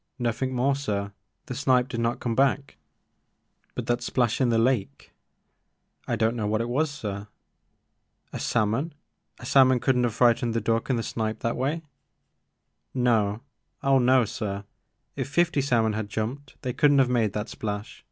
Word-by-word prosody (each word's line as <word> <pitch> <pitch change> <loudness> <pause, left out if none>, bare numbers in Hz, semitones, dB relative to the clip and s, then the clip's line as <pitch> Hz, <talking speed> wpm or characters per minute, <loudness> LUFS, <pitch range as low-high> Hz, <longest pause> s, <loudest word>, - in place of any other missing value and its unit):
Nothing 125 +1 -1
more 135 +3 +2
sir. 100 -7 -3 0.3
The 140 - -5
snipe 125 -1 +2
did 115 -3 -4
not 115 +1 0
come 120 - -2
back." 135 +2 +1 0.5
" - - -45
But - - -3
that 120 0 0
splash 120 0 0
in 125 - +3
the 115 - +2
lake? 115 -3 0 0.3
" - - -49
" - - -41
I - - 0
don't 110 +2 +1
know 110 -3 -2
what 110 +1 +1
it 115 +1 -2
was 150 +6 +1
sir." 105 -8 -5 1.1
A - - -4
salmon? 120 +8 0 0.4
A - - -11
salmon 130 -2 +5
could 125 +2 +2
n't 125 0 +2
have 115 -3 -2
fright 120 -2 +5
ened 120 -2 -2
the 115 - +1
duck 115 +2 -1
and 130 - +2
the 115 - -2
snipe 110 -1 -3
that 115 - -1
way? 145 +6 -1 0.6
" - - -52 0.2
No 105 -1 +1 0.2
— - - -43
oh 135 -1 +4
no, 125 -1 +4
sir. 100 -1 -4 0.5
If - - -3
fifty 170 -1 +2
salmon 115 -5 +2
had 105 -1 -3
jumped 125 +6 -4
they 125 - -2
could 145 +3 +4
n't 145 - +4
have 130 - +5
made 115 -5 +1
that 105 +1 -3
splash. 105 -1 -5
120 Hz, 195 wpm, -26 LUFS, 110-130 Hz, 1.1 s, salmon